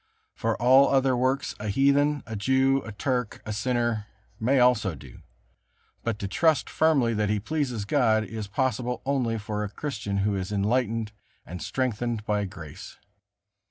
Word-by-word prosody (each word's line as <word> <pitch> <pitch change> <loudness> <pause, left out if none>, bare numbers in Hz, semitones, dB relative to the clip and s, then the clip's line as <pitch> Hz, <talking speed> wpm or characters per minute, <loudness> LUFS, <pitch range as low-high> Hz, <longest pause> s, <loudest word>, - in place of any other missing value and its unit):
For 115 -1 -2
all 130 +4 +6
other 135 -1 +3
works 130 +3 0
a 105 - -4
heathen, 140 +6 +2
a 110 - -6
Jew, 130 +5 +2
a 110 - -8
Turk, 125 +2 -2
a 110 - -3
sinner, 120 -1 -1 0.3
may 130 +5 +2
also 110 -8 +3
do; 70 -3 -13 0.8
but 115 -2 -1
to 100 - -4
trust 155 - +2
firmly 140 -7 +3
that 105 -1 0
he 105 0 +1
pleases 125 -3 -2
God, 110 -3 +2
is 110 -1 -6
possible 125 +1 -1
only 130 -5 0
for 105 0 -3
a 105 - -3
Christian 105 -5 -4
who 105 -1 +1
is 95 0 -4
enlightened 110 +1 0 0.3
and 90 +2 -7
strengthened 120 -3 -2
by 105 -1 0
grace. 85 -5 -10
115 Hz, 160 wpm, -26 LUFS, 105-130 Hz, 0.8 s, all